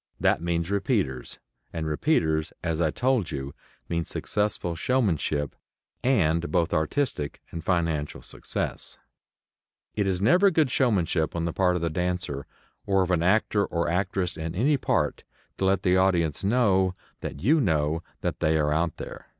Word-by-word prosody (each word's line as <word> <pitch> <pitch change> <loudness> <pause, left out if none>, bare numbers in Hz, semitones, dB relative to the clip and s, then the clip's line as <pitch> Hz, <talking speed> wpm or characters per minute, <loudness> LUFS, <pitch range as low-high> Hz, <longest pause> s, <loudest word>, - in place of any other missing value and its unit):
That - - +2
means 85 +1 -1
"repeaters," 95 - -1 0.3
and 80 -1 -3
repeaters, 80 - +1
as 85 -1 -1
I 80 - +3
told 125 +1 +1
you, 70 -1 -5 0.3
mean 85 -1 -1
successful 105 -1 -1
showmanship, 80 - 0 0.5
and 85 -10 +2
both 85 -2 +1
artistic 80 - -1
and 85 - -6
financial 85 -5 -1
success. - - -4 1.0
It 105 -2 0
is 95 -2 0
never 180 - +5
good 160 -7 +2
showmanship 90 - +1
on 85 -1 -1
the 85 - -2
part 90 -2 +2
of 85 - -2
the 85 - 0
dancer, 90 -5 -2 0.4
or 95 -1 +3
of 90 - -2
an 85 -2 +2
actor 100 +3 +3
or 85 -3 -1
actress 90 0 -1
in 80 +1 -4
any 135 +10 +3
part, 135 - 0 0.4
to 95 - +1
let 95 0 +2
the 90 -1 +4
audience 90 -5 +2
know 95 -4 +3 0.2
that 70 - -6
you 150 +7 +4
know 80 - +1 0.4
they 80 0 +2
are 75 -1 +2
out 85 +2 0
there. - - -8
90 Hz, 155 wpm, -26 LUFS, 80-100 Hz, 1.0 s, never